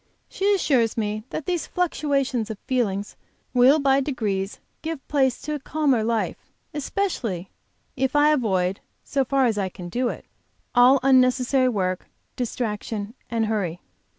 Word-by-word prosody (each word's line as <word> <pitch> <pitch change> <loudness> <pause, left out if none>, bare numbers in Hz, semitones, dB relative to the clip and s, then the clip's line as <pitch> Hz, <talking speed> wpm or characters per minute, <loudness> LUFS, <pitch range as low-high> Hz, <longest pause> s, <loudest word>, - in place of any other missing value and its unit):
She 400 +1 +1
assures 250 - +2
me 215 0 -2
that 300 - -5
these 355 -3 -1
fluctuations 275 -9 0
of 220 - -5
feeling 205 -6 0 0.5
will 255 +4 +6
by 275 -2 +3
degrees 210 -8 -2 0.2
give 320 -3 -5
place 265 -4 +2
to 300 - -3
a 295 - -3
calmer 275 -4 +1
life, 225 0 0 0.4
especially 265 - -2 0.4
if 265 0 0
I 295 +1 +5
avoid, 195 -9 +1 0.2
so 275 - 0
far 270 +1 +2
as 220 -4 +1
I 190 -1 -1
can 175 -1 -9
do 245 +6 0
it, - - -7 0.5
all 250 +2 +6
unnecessary 255 0 +4
work, 185 -5 -1 0.3
distraction 220 -3 -3 0.2
and 230 -2 0
hurry. 195 -6 -1
250 Hz, 145 wpm, -24 LUFS, 215-275 Hz, 0.5 s, will